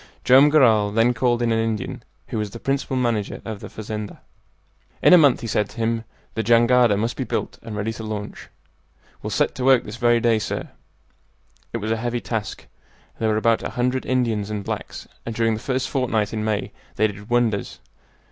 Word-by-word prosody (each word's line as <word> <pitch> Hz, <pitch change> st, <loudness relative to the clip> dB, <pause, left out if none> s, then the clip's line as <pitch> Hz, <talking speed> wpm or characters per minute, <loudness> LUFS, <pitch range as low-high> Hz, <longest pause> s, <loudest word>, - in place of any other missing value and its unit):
Joam 135 Hz, +3 st, +7 dB
Garral 115 Hz, -9 st, +4 dB
then 115 Hz, +4 st, +2 dB
called 120 Hz, 0 st, +1 dB
in 115 Hz, -, +1 dB
an 115 Hz, -, +2 dB
Indian 110 Hz, -3 st, -3 dB, 0.3 s
who 110 Hz, -, -2 dB
was 105 Hz, -1 st, -2 dB
the 115 Hz, -, -9 dB
principal 135 Hz, 0 st, -1 dB
manager 115 Hz, -5 st, -1 dB
of 110 Hz, -3 st, -5 dB
the -, -, -9 dB
fazenda. 105 Hz, -1 st, -6 dB, 0.8 s
"In -, -, +6 dB
a -, -, +10 dB
month," 140 Hz, -5 st, +4 dB
he -, -, -5 dB
said 105 Hz, -1 st, 0 dB
to -, -, -15 dB
him, 115 Hz, 0 st, -1 dB, 0.3 s
"the 110 Hz, -, -1 dB
jangada 120 Hz, -1 st, +4 dB
must 115 Hz, +3 st, -1 dB
be -, -, -2 dB
built -, -, -4 dB
and 110 Hz, -, -7 dB
ready 105 Hz, +2 st, -2 dB
to 110 Hz, -, -8 dB
launch." 105 Hz, -1 st, -6 dB, 0.7 s
"We'll -, -, -4 dB
set -, -, +1 dB
to 125 Hz, -, -5 dB
work 130 Hz, -2 st, +5 dB
this 105 Hz, +2 st, -8 dB
very 120 Hz, 0 st, +3 dB
day, 115 Hz, -1 st, +2 dB
sir." 105 Hz, -, -4 dB, 1.0 s
It -, -, -2 dB
was 110 Hz, 0 st, -3 dB
a 115 Hz, -, +1 dB
heavy 120 Hz, +1 st, -2 dB
task. 110 Hz, -3 st, -4 dB, 0.5 s
There 110 Hz, -, +1 dB
were 110 Hz, -, +1 dB
about 115 Hz, +1 st, +2 dB
a -, -, -4 dB
hundred 125 Hz, +1 st, 0 dB
Indians 115 Hz, -5 st, 0 dB
and 105 Hz, -2 st, -4 dB
blacks, -, -, -6 dB, 0.2 s
and 115 Hz, -, -5 dB
during 115 Hz, 0 st, +2 dB
the 110 Hz, -, -3 dB
first 130 Hz, +2 st, -2 dB
fortnight 115 Hz, -6 st, -1 dB
in 110 Hz, -1 st, -2 dB
May 110 Hz, -1 st, -1 dB, 0.2 s
they 110 Hz, -, +2 dB
did 105 Hz, +1 st, -5 dB
wonders. 120 Hz, -4 st, 0 dB
115 Hz, 205 wpm, -22 LUFS, 110-120 Hz, 1.0 s, a